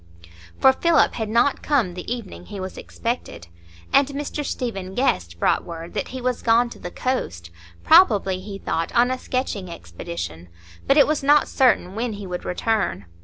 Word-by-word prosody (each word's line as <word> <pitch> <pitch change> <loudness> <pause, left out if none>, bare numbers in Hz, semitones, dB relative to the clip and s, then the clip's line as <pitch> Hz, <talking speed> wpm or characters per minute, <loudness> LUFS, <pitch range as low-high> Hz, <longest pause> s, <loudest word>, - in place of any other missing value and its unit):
For 265 - +6
Philip 330 +2 +3
had 220 -2 -3
not 235 +5 +2
come 250 -12 +1
the 180 +5 -7
evening 235 -5 -6
he 205 -2 -7
was 185 0 -6
expected, 230 - -5 0.4
and 275 - +5
Mr 290 +1 -4
Stephen 195 -9 -4
Guest 85 - 0
brought - - +2
word 170 0 -8
that - - -2
he 260 - -6
was 250 -1 -1
gone 235 +1 +3
to - - -11
the 175 - -6
coast,—probably, 90 - +1
he 195 +1 -7
thought, 165 -3 -2
on 245 +2 +4
a 255 - -2
sketching 225 -9 -3
expedition; 85 - -7 0.4
but 275 - +4
it 285 - +8
was 305 0 0
not 290 +1 +4
certain 245 -8 +2
when 230 +2 -2
he 205 -1 -7
would 180 -1 -5
return. 210 - -1
215 Hz, 170 wpm, -23 LUFS, 175-255 Hz, 0.4 s, it